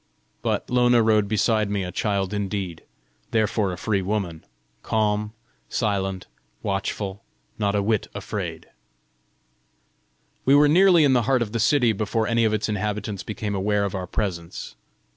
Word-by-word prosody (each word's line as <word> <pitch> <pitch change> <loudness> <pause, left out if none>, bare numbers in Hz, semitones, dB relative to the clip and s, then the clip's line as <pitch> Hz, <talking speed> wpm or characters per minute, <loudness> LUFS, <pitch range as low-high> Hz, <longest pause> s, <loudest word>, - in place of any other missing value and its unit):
But - - -1
Lona 120 -1 +4
rode 110 -2 +3
beside 110 0 +1
me 100 -1 -1
a 90 - -4
child 100 0 -1
indeed, 100 -4 -3 0.5
therefore 110 -3 +1
a 90 - -5
free 100 0 0
woman 95 -4 -3 0.4
calm, 105 0 0 0.4
silent, 95 -4 -1 0.4
watchful, 100 0 -3 0.4
not 100 -1 +1
a 100 - +1
whit 110 0 0
afraid! - - -5 1.8
We 135 - +5
were 145 +1 +6
nearly 175 +1 +6
in 140 -2 +4
the 125 - +4
heart 130 -3 +3
of 105 - -7
the 115 - -2
city 115 0 +3
before 110 +2 -1
any 115 0 +2
of 110 - +2
its 110 -1 0
inhabitants 105 -1 -2
became 105 -1 -4
aware 100 +1 +1
of 100 - -3
our 95 -2 -4
presence. 85 -4 -4
105 Hz, 150 wpm, -24 LUFS, 100-115 Hz, 1.8 s, were